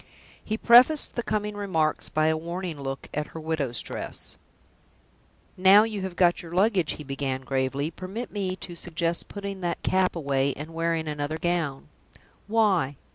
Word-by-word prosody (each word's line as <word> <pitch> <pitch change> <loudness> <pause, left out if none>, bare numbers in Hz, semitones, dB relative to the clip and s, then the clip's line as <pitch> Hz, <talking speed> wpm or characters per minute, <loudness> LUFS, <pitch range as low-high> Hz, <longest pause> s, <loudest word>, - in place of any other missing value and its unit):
He 215 - -2
prefaced 250 +7 +6
the 240 - -1
coming 210 -2 -2
remarks 175 -7 -1
by 155 0 +1
a 160 0 +3
warning 170 -1 -5
look 135 0 -5
at 150 0 -2
her - - -4
widow's 150 -8 -2
dress. - - -6 1.2
"Now 195 +3 +7
you 215 -3 -3
have 190 -2 -4
got 175 -1 +3
your 170 0 -8
luggage," 190 -4 +3
he 150 - -8
began, 135 -1 -3
gravely, 135 +3 -1
"permit 195 +8 -6
me 190 -3 -2
to 180 -2 -8
suggest 170 0 -2
putting 200 -1 -6
that 175 -1 -2
cap 185 -1 +2
away, 140 -3 0
and 155 +3 -8
wearing 165 -1 -1
another 150 +1 -2
gown." 165 -5 -1 0.6
"Why?" 200 -10 +2
170 Hz, 160 wpm, -26 LUFS, 150-195 Hz, 1.2 s, Now